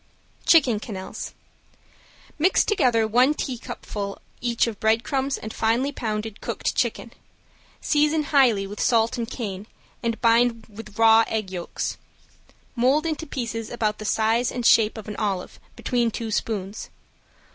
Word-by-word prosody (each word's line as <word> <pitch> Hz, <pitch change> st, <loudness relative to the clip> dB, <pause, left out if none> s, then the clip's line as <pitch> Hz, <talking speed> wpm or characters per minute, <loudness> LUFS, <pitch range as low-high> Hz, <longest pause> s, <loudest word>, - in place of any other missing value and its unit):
~CHICKEN 265 Hz, -10 st, +5 dB
QUENELLES~ 195 Hz, -4 st, -7 dB, 1.0 s
Mix 360 Hz, +5 st, +4 dB
together 250 Hz, -, +2 dB
one 250 Hz, +7 st, +4 dB
teacupful 210 Hz, -6 st, -5 dB, 0.2 s
each 240 Hz, -1 st, +1 dB
of 225 Hz, -4 st, -5 dB
breadcrumbs 265 Hz, +5 st, +1 dB
and 220 Hz, -, -7 dB
finely 235 Hz, +5 st, +1 dB
pounded 215 Hz, -4 st, -4 dB
cooked -, -, -2 dB
chicken. -, -, -2 dB, 0.7 s
Season 300 Hz, +1 st, +2 dB
highly 255 Hz, -9 st, +3 dB
with 205 Hz, +1 st, -8 dB
salt 230 Hz, +1 st, +2 dB
and 230 Hz, 0 st, -3 dB
cayenne 205 Hz, -5 st, -5 dB, 0.3 s
and 230 Hz, -1 st, -2 dB
bind 230 Hz, -1 st, +3 dB
with 210 Hz, -1 st, -11 dB
raw 225 Hz, 0 st, +6 dB
egg 215 Hz, -4 st, -3 dB
yolks. 175 Hz, -2 st, -4 dB, 0.8 s
Mold 265 Hz, +6 st, +2 dB
into 320 Hz, 0 st, -3 dB
pieces 230 Hz, -5 st, -4 dB
about 215 Hz, -3 st, -1 dB
the 215 Hz, -, -6 dB
size 225 Hz, +3 st, +1 dB
and 245 Hz, -1 st, -4 dB
shape 225 Hz, -1 st, +5 dB
of 220 Hz, -, -8 dB
an 210 Hz, -, -6 dB
olive, 195 Hz, -4 st, -3 dB, 0.2 s
between 240 Hz, -2 st, 0 dB
two 225 Hz, 0 st, -5 dB
spoons. 205 Hz, -1 st, -3 dB
230 Hz, 135 wpm, -24 LUFS, 215-250 Hz, 1.0 s, raw